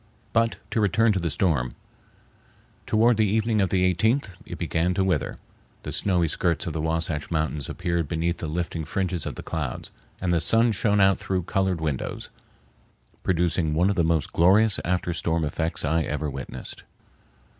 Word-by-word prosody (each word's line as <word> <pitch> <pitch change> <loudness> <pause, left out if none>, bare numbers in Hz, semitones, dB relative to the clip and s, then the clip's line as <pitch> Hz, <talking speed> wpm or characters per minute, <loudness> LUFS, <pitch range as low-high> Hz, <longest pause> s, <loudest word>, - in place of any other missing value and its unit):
But 115 0 +2
to 110 - +1
return 110 +3 +3
to 95 - 0
the 85 -1 -1
storm. 70 -7 0 1.1
Toward 115 +1 +4
the 110 -2 +3
evening 110 0 +1
of 95 - +1
the 95 -1 +2
18th 110 +6 +1 0.2
it - - -6
began 90 +2 0
to 95 - +2
wither. 95 -1 0 0.5
The - - -5
snowy 90 -4 +1
skirts 85 +1 0
of 80 - -3
the 80 - -2
Wahsatch 80 -2 -2
Mountains 75 -3 -2
appeared 85 -3 -1
beneath 85 +2 -1
the 85 - -4
lifting 85 +1 -3
fringes 90 -1 -2
of - - -5
the - - -8
clouds, 75 -7 -4 0.3
and 90 -1 0
the 85 - +2
sun 115 +8 +4
shone 105 0 +1
out 95 0 +4
through 95 -2 -1
colored 95 -1 0
windows, 75 -5 -3 0.9
producing 85 -3 +1
one 90 +5 +3
of - - -2
the 85 - +2
most 80 -2 0
glorious 100 +4 +5
after 90 0 -1
storm 80 -1 0
effects 80 +2 -2
I 80 +3 +2
ever 75 -1 -2
witnessed. 65 -1 -7
85 Hz, 175 wpm, -25 LUFS, 80-95 Hz, 1.1 s, glorious